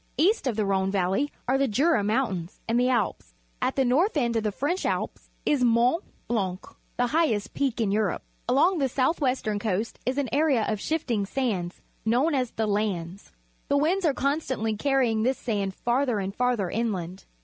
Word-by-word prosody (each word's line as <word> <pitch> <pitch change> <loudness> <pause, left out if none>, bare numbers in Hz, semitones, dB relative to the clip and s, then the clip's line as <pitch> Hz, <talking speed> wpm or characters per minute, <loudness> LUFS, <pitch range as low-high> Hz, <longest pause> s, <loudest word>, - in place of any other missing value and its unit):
East 360 - +3
of 240 - 0
the 215 -1 0
Rhone 190 -1 +1
Valley 195 +8 0 0.2
are 265 +2 +2
the 275 - +3
Jura 255 +1 +2
Mountains 205 -5 -1
and 230 +1 +2
the 250 - +3
Alps^ 235 - -1 0.3
At - - 0
the 270 - +2
north 315 - +2
end 235 -4 +1
of 225 - +2
the 210 -1 -1
French 295 - -1
Alps - - -3 0.2
isJTourit 250 +3 +3 0.3
Blanc 190 -5 -2 0.2
— - - -39
the 245 - +2
high 320 +6 +2
est 210 -6 -2
peak 270 -5 -1
in 215 -4 +1
Europe. 205 -3 0 0.3
Along 325 +8 +3
the 270 -2 +1
south 270 +6 +1
western 250 -6 0
coast 210 +1 -2
is 255 +2 -1
an 285 -2 0
area 280 -5 +2
of 215 -2 -2
shifting 240 -11 -1
sand 195 -9 -2 0.3
known 250 +9 +2
as 255 -3 0
the 220 - -2
"landes." 200 -3 -2 0.4
The 285 - +2
winds 345 +7 +1
are 300 -5 +2
constanth' 260 -7 -1
carry 270 -3 +2
ing 220 -1 0
this 255 +4 +1
sand 200 -5 -2
farther 245 -1 +1
and 195 -1 -3
farther 240 -6 0
inland. 190 -5 -3
235 Hz, 195 wpm, -26 LUFS, 205-275 Hz, 0.4 s, East